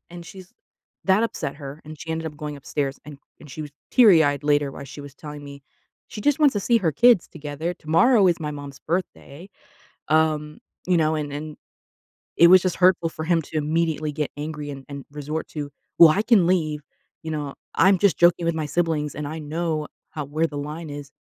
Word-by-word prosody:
And 170 Hz, -1 st, -10 dB
she's 185 Hz, 0 st, -12 dB, 0.5 s
that 195 Hz, +3 st, +3 dB
upset 225 Hz, -10 st, -3 dB
her, 140 Hz, 0 st, -9 dB
and 155 Hz, 0 st, -10 dB
she 160 Hz, -, -7 dB
ended 160 Hz, 0 st, -3 dB
up 150 Hz, -2 st, -7 dB
going 150 Hz, -1 st, -6 dB
upstairs, 140 Hz, 0 st, -3 dB
and 150 Hz, -1 st, -10 dB, 0.2 s
and 150 Hz, -, -13 dB
she 155 Hz, +4 st, -6 dB
was 150 Hz, -, -8 dB, 0.2 s
teary 200 Hz, -11 st, +7 dB
eyed 145 Hz, 0 st, 0 dB
later 145 Hz, -1 st, +2 dB
while 140 Hz, -, -9 dB
she 140 Hz, +2 st, -10 dB
was 140 Hz, -1 st, -11 dB
telling 150 Hz, 0 st, -9 dB
me 140 Hz, -1 st, -11 dB, 0.5 s
she 215 Hz, -, -8 dB
just 290 Hz, +4 st, +2 dB
wants 290 Hz, -3 st, +5 dB
to 205 Hz, -, 0 dB
see 230 Hz, +3 st, +3 dB
her 170 Hz, -6 st, +1 dB
kids 235 Hz, -, +4 dB
together. 155 Hz, +3 st, -5 dB
Tomorrow 195 Hz, +8 st, +3 dB
is 170 Hz, -1 st, 0 dB
my 150 Hz, -, -3 dB
mom's 145 Hz, -2 st, -9 dB
birthday, 170 Hz, -1 st, -5 dB, 0.6 s
um, 155 Hz, -1 st, +1 dB, 0.3 s
you 180 Hz, -1 st, +3 dB
know? 155 Hz, 0 st, +2 dB
And 150 Hz, -2 st, -3 dB
and 150 Hz, +1 st, -6 dB, 0.8 s
it 170 Hz, -, +8 dB
was 185 Hz, +1 st, +8 dB
just 185 Hz, -2 st, -1 dB
hurtful 180 Hz, -2 st, +3 dB
for 160 Hz, -, -7 dB
him 165 Hz, 0 st, +2 dB
to 155 Hz, -, -6 dB
immediately 155 Hz, 0 st, 0 dB
get 150 Hz, 0 st, -3 dB
angry 150 Hz, -1 st, -5 dB
and 135 Hz, -1 st, -9 dB
and 140 Hz, -1 st, -8 dB
resort 150 Hz, +2 st, -5 dB
to, 145 Hz, -2 st, -6 dB, 0.3 s
"Well, 170 Hz, -2 st, +10 dB
I 200 Hz, +7 st, +2 dB
can 215 Hz, -7 st, +4 dB
leave." 155 Hz, -5 st, 0 dB, 0.4 s
You 160 Hz, -, -5 dB
know? 145 Hz, -2 st, -4 dB, 0.2 s
"I'm 195 Hz, 0 st, +5 dB
just 200 Hz, -1 st, +3 dB
joking 175 Hz, 0 st, +4 dB
with 170 Hz, -1 st, 0 dB
my 155 Hz, -1 st, -2 dB
siblings, 155 Hz, -3 st, -1 dB
and 150 Hz, 0 st, -4 dB
I 155 Hz, +2 st, -5 dB
know 155 Hz, 0 st, -2 dB, 0.3 s
how 150 Hz, -2 st, -5 dB
where 155 Hz, +4 st, 0 dB
the 145 Hz, -, -7 dB
line 150 Hz, +3 st, -6 dB
is." 145 Hz, 0 st, -8 dB
155 Hz, 210 wpm, -23 LUFS, 145-170 Hz, 0.8 s, Well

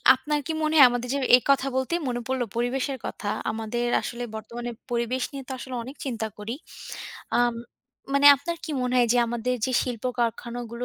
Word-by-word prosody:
আপনার 295 Hz, +3 st, -1 dB
কি -, -, -1 dB
মনে 310 Hz, +1 st, +1 dB
হয় 275 Hz, -, +11 dB
আমাদের 245 Hz, 0 st, -2 dB
যে -, -, +1 dB, 0.2 s
এই 250 Hz, -, +3 dB
কথা 275 Hz, -1 st, +4 dB
বলতেই 260 Hz, +7 st, 0 dB
মনে 245 Hz, -1 st, -1 dB
পড়লো 260 Hz, -2 st, 0 dB
পরিবেশের 260 Hz, +3 st, -1 dB
কথা। 205 Hz, -, -5 dB, 0.2 s
আমাদের 225 Hz, +2 st, -2 dB, 0.2 s
আসলে 240 Hz, 0 st, -5 dB
বর্তমানে 240 Hz, +2 st, -6 dB, 0.2 s
পরিবেশ 240 Hz, +2 st, 0 dB
নিয়ে 275 Hz, -1 st, -6 dB
তো -, -, -6 dB
আসলে 255 Hz, 0 st, -6 dB
অনেক 265 Hz, +4 st, -9 dB
চিন্তা 225 Hz, -4 st, -2 dB
করি। 215 Hz, +4 st, -5 dB, 0.8 s
আম 240 Hz, -1 st, +3 dB, 0.6 s
মানে 280 Hz, +1 st, +5 dB
আপনার 340 Hz, +5 st, -4 dB
কি -, -, -5 dB
মনে 250 Hz, 0 st, 0 dB
হয় 240 Hz, -1 st, +4 dB
যে, 245 Hz, -, +3 dB
আমাদের 240 Hz, +2 st, -1 dB
যে, 255 Hz, -, -2 dB
শিল্প 245 Hz, -3 st, -5 dB
কারখানাগুলো 235 Hz, 0 st, -2 dB
245 Hz, 190 wpm, -26 LUFS, 235-265 Hz, 0.8 s, হয়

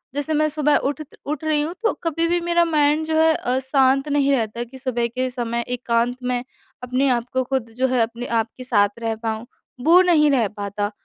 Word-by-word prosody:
जैसे 290 Hz, +2 st, -2 dB
मैं 305 Hz, +1 st, +2 dB
सुबह 300 Hz, -1 st, +2 dB
उठ 285 Hz, +3 st, -2 dB
त 300 Hz, -, -13 dB
उठ 300 Hz, +1 st, -4 dB
रही 305 Hz, -1 st, +1 dB
हूँ 320 Hz, +3 st, -3 dB
तो 450 Hz, -, +3 dB
कभी 330 Hz, 0 st, 0 dB
भी 350 Hz, +1 st, +1 dB
मेरा 345 Hz, 0 st, +2 dB
माइंड 305 Hz, -1 st, +2 dB
जो 315 Hz, 0 st, -1 dB
है 320 Hz, 0 st, +5 dB
अ, 250 Hz, +1 st, -1 dB
शांत 270 Hz, +1 st, +2 dB
नहीं 280 Hz, -1 st, +2 dB
रहता 235 Hz, -2 st, -1 dB
कि 250 Hz, +3 st, -12 dB
सुबह 245 Hz, -3 st, -1 dB
के 255 Hz, +2 st, -2 dB
समय 235 Hz, -1 st, -3 dB
एकांत 245 Hz, 0 st, 0 dB
मैं 250 Hz, 0 st, -1 dB, 0.4 s
अपने 255 Hz, +2 st, 0 dB
आप 240 Hz, -2 st, +1 dB
को 260 Hz, 0 st, +1 dB
खुद 255 Hz, -2 st, -2 dB
जो 260 Hz, +1 st, +2 dB
है 250 Hz, -2 st, +1 dB
अपने 235 Hz, +2 st, -2 dB, 0.2 s
आप 220 Hz, -, -6 dB
के 255 Hz, -, -7 dB
साथ 205 Hz, -5 st, +3 dB
रह 225 Hz, -1 st, -1 dB
पाऊँ। 220 Hz, +1 st, -3 dB, 0.4 s
वो 350 Hz, +3 st, +7 dB
नहीं 315 Hz, -5 st, +4 dB
रह 240 Hz, -6 st, +2 dB
पाता, 205 Hz, 0 st, -3 dB
260 Hz, 225 wpm, -22 LUFS, 235-300 Hz, 0.4 s, वो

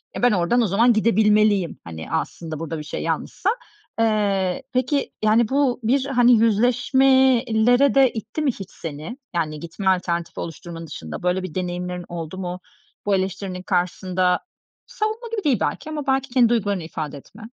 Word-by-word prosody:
"Ya, -, -, -4 dB
ben 245 Hz, -, +6 dB
oradan 200 Hz, +6 st, +2 dB
o 225 Hz, -, +2 dB
zaman 230 Hz, +6 st, +4 dB
gidebilmeliyim." 210 Hz, -3 st, +3 dB
hani, 80 Hz, -, -8 dB
aslında 160 Hz, -1 st, -3 dB
burada 165 Hz, 0 st, -4 dB
bir -, -, -6 dB
şey 150 Hz, -, -5 dB
yanlışsa. 390 Hz, -, -1 dB, 0.5 s
Eee, 200 Hz, -4 st, +1 dB
peki, 255 Hz, +3 st, 0 dB
yani, 215 Hz, +1 st, +4 dB
bu 270 Hz, -2 st, +1 dB
bir, 265 Hz, +4 st, +2 dB
hani, 245 Hz, -3 st, +4 dB
yüzleşmeye 250 Hz, +3 st, +4 dB, 0.2 s
lere 275 Hz, +3 st, +4 dB
de 265 Hz, -3 st, +5 dB
itti 225 Hz, +7 st, -5 dB
mi 280 Hz, -4 st, +2 dB
hiç 195 Hz, -5 st, -10 dB
seni? 160 Hz, -, -7 dB, 0.2 s
Yani, 155 Hz, -3 st, -1 dB
gitme 170 Hz, +4 st, -6 dB
alternatifi 170 Hz, -2 st, -1 dB
oluşturmanın 165 Hz, 0 st, -7 dB
dışında 80 Hz, -, -7 dB
böyle 180 Hz, +1 st, +1 dB
bir 185 Hz, -2 st, -7 dB
deneyimlerin 180 Hz, 0 st, -3 dB
oldu 170 Hz, +1 st, -6 dB
mu 180 Hz, -1 st, -4 dB, 0.5 s
bu 200 Hz, -1 st, +3 dB
eleştirinin 190 Hz, -1 st, -3 dB
karşısında? 180 Hz, 0 st, 0 dB, 0.5 s
Savunma 460 Hz, -1 st, -3 dB
gibi 430 Hz, -3 st, -2 dB
değil 260 Hz, -9 st, +2 dB
belki 310 Hz, -, -2 dB
ama 295 Hz, -3 st, -5 dB
belki 270 Hz, 0 st, +1 dB
kendi 240 Hz, -2 st, +4 dB
duygularını 205 Hz, -6 st, 0 dB
ifade 155 Hz, -3 st, -5 dB
etme. 210 Hz, +10 st, -14 dB
205 Hz, 165 wpm, -22 LUFS, 175-245 Hz, 0.5 s, ben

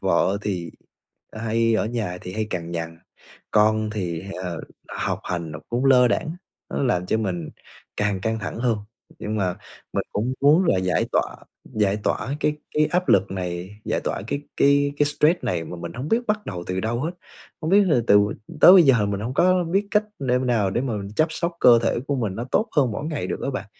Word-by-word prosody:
Vợ 100 Hz, +1 st, +2 dB
thì 90 Hz, -5 st, -3 dB, 0.6 s
hay 115 Hz, +1 st, 0 dB
ở 110 Hz, -, +1 dB
nhà 110 Hz, -6 st, -3 dB
thì 90 Hz, -, -7 dB
hay 110 Hz, -, -1 dB
cằn 85 Hz, -3 st, -4 dB
nhằn, 80 Hz, -1 st, -5 dB, 0.5 s
con 110 Hz, 0 st, +3 dB
thì, 90 Hz, -5 st, -4 dB, 0.2 s
ờ, 85 Hz, -2 st, -4 dB, 0.3 s
học -, -, -3 dB
hành 85 Hz, -3 st, -3 dB
nó 75 Hz, -, -6 dB
cũng 120 Hz, +3 st, -1 dB
lơ 125 Hz, -2 st, +6 dB
đãng, 155 Hz, -, -1 dB, 0.4 s
nó -, -, -2 dB
làm 90 Hz, -8 st, +1 dB
cho 110 Hz, -, +1 dB
mình 90 Hz, -6 st, -3 dB, 0.5 s
càng 105 Hz, -2 st, 0 dB
căng 110 Hz, +3 st, -1 dB
thẳng 105 Hz, -, -5 dB
hơn. 115 Hz, -3 st, +1 dB, 0.4 s
Nhưng 110 Hz, +1 st, -3 dB
mà 95 Hz, -3 st, -1 dB, 0.4 s
mình -, -, 0 dB
cũng 120 Hz, +5 st, -1 dB
muốn 150 Hz, +6 st, +5 dB
là 95 Hz, -, +3 dB
giải 95 Hz, -1 st, +1 dB
tỏa -, -, 0 dB, 0.4 s
giải 105 Hz, -2 st, +2 dB
tỏa 140 Hz, -, -1 dB
cái 150 Hz, 0 st, +1 dB, 0.2 s
cái 150 Hz, 0 st, +3 dB
áp 180 Hz, +2 st, -1 dB
lực 100 Hz, 0 st, +4 dB
này, 90 Hz, +2 st, -5 dB
giải -, -, -1 dB
tỏa -, -, -2 dB
cái 140 Hz, -, -2 dB, 0.2 s
cái 140 Hz, 0 st, +3 dB
cái 145 Hz, -, +4 dB
stress 150 Hz, +4 st, +2 dB
này 110 Hz, -9 st, -1 dB
mà 90 Hz, -, -7 dB
mình 85 Hz, 0 st, -7 dB
hổng 130 Hz, +5 st, -5 dB
biết 230 Hz, +6 st, +3 dB
bắt 210 Hz, 0 st, -1 dB
đầu 90 Hz, -3 st, -5 dB
từ 90 Hz, 0 st, -2 dB
đâu 115 Hz, +3 st, -2 dB
hết. 155 Hz, +5 st, -1 dB, 0.5 s
Không 160 Hz, +1 st, -2 dB
biết 200 Hz, -, +6 dB
là 155 Hz, -9 st, +3 dB
từ 105 Hz, 0 st, +6 dB, 0.4 s
tới 180 Hz, -, +10 dB
bây 185 Hz, -2 st, +9 dB
giờ 125 Hz, -8 st, +4 dB
mình 100 Hz, 0 st, -2 dB
hông 120 Hz, +5 st, -4 dB
có 185 Hz, +2 st, +3 dB
biết 195 Hz, +5 st, 0 dB
cách 210 Hz, 0 st, +3 dB, 0.2 s
đêm 125 Hz, -1 st, +1 dB
nào 110 Hz, -6 st, +2 dB
để 120 Hz, -, 0 dB
mà 130 Hz, -3 st, -2 dB, 0.2 s
chăm 155 Hz, -, +3 dB
sóc 170 Hz, +2 st, -2 dB
cơ 120 Hz, -2 st, +7 dB
thể 120 Hz, -, +1 dB
của 145 Hz, -, +1 dB
mình 110 Hz, -7 st, -2 dB
nó 120 Hz, -, -3 dB
tốt 220 Hz, -, +2 dB
hơn 130 Hz, -5 st, +4 dB
mỗi 140 Hz, -, -4 dB
ngày 155 Hz, -2 st, -3 dB
được -, -, -4 dB
á -, -, -1 dB
bạn. 130 Hz, -6 st, -5 dB
115 Hz, 220 wpm, -23 LUFS, 95-140 Hz, 0.6 s, tới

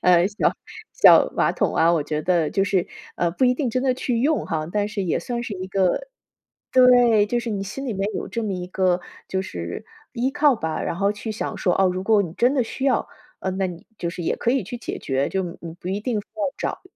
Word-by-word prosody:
呃， 180 Hz, -1 st, +5 dB
小 205 Hz, +1 st, +1 dB, 0.4 s
小 -, -, +7 dB
马 -, -, +3 dB
桶 -, -, 0 dB
啊， 165 Hz, +1 st, +4 dB
我 165 Hz, -3 st, +2 dB
觉 150 Hz, +1 st, -3 dB
得 170 Hz, -3 st, +1 dB
就 195 Hz, -, +1 dB
是 185 Hz, -2 st, +1 dB, 0.3 s
呃， 170 Hz, -, +1 dB
不 220 Hz, +10 st, +1 dB
一 250 Hz, 0 st, +4 dB
定 260 Hz, 0 st, -1 dB
真 255 Hz, +2 st, -1 dB
的 265 Hz, -1 st, +3 dB
去 250 Hz, -2 st, -1 dB
用 305 Hz, +4 st, +1 dB
哈， 155 Hz, -1 st, -2 dB
但 205 Hz, -1 st, 0 dB
是 210 Hz, -1 st, -3 dB
也 170 Hz, -, 0 dB
算 240 Hz, -1 st, -3 dB
是 215 Hz, -, -5 dB
一 185 Hz, 0 st, -5 dB
个 195 Hz, -, +1 dB, 0.6 s
对， 245 Hz, -4 st, +6 dB
就 240 Hz, +3 st, 0 dB
是 235 Hz, 0 st, -4 dB
你 200 Hz, -2 st, -2 dB
心 265 Hz, +8 st, -6 dB
里 240 Hz, -, -1 dB
面 195 Hz, +1 st, -1 dB
有 -, -, -4 dB
这 230 Hz, -, -4 dB
么 210 Hz, -3 st, -2 dB
一 180 Hz, -1 st, -4 dB
个 185 Hz, -1 st, +1 dB, 0.3 s
就 190 Hz, -, -1 dB
是 85 Hz, -, -6 dB, 0.3 s
依 245 Hz, +1 st, 0 dB
靠 295 Hz, -1 st, +4 dB
吧。 160 Hz, -5 st, -3 dB
然 170 Hz, -, -2 dB
后 200 Hz, +2 st, +1 dB
去 215 Hz, +2 st, -6 dB
想 215 Hz, -, -4 dB
说 180 Hz, -, +1 dB
哦， 190 Hz, -, +5 dB
如 185 Hz, +1 st, -2 dB
果 210 Hz, +1 st, +4 dB
你 165 Hz, -, -6 dB
真 245 Hz, +8 st, +2 dB
的 260 Hz, -, +3 dB
需 265 Hz, +4 st, -5 dB
要， 265 Hz, -3 st, +2 dB, 0.3 s
呃， -, -, -4 dB
那 190 Hz, 0 st, 0 dB
你 175 Hz, -1 st, -10 dB
就 170 Hz, -, -3 dB
是 175 Hz, -, -6 dB
也 -, -, 0 dB
可 235 Hz, -, 0 dB
以 265 Hz, -2 st, +1 dB
去 220 Hz, +6 st, -6 dB
解 240 Hz, -, -5 dB
决， 135 Hz, +1 st, -1 dB
就 190 Hz, -, 0 dB
你 170 Hz, -1 st, -7 dB
你 165 Hz, -1 st, -7 dB
不 175 Hz, -, -13 dB
一 195 Hz, +2 st, -1 dB
定 220 Hz, -1 st, -1 dB
非 -, -, -17 dB
要 315 Hz, -, -2 dB
找 -, -, -3 dB
200 Hz, 275 characters per minute, -23 LUFS, 180-240 Hz, 0.6 s, 小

